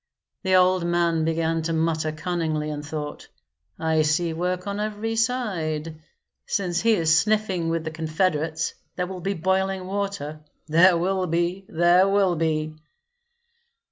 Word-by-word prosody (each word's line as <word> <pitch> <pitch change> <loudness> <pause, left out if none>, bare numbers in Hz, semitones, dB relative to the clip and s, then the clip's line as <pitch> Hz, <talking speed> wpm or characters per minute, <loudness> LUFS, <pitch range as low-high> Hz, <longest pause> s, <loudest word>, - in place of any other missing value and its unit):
The 190 -1 +2
old 185 -1 +4
man 170 -2 +1
began 165 0 0
to 165 +1 -2
mutter 160 -1 0
cunningly, 155 -2 -2
and 150 0 -5
thought, 150 0 -6 0.5
"I 160 -1 +1
see 160 +2 +1
work 180 +2 -2
on 200 0 -3
every 215 +1 -2
side; 170 -10 -1 0.5
since 175 -3 -1
he 230 0 +4
is 160 -5 +3
sniffing 195 -2 +1
with 165 -1 -1
the 160 - -4
confederates 160 0 -1 0.2
there 180 - -1
will 185 0 -7
be 195 +3 -1
boiling 190 +2 0
water, 195 -6 -3 0.3
there 170 +3 +5
will 185 +2 0
be, 175 +3 -1
there 175 +3 +4
will 195 -2 +2
be!" 155 -1 -1
170 Hz, 140 wpm, -24 LUFS, 160-190 Hz, 0.5 s, there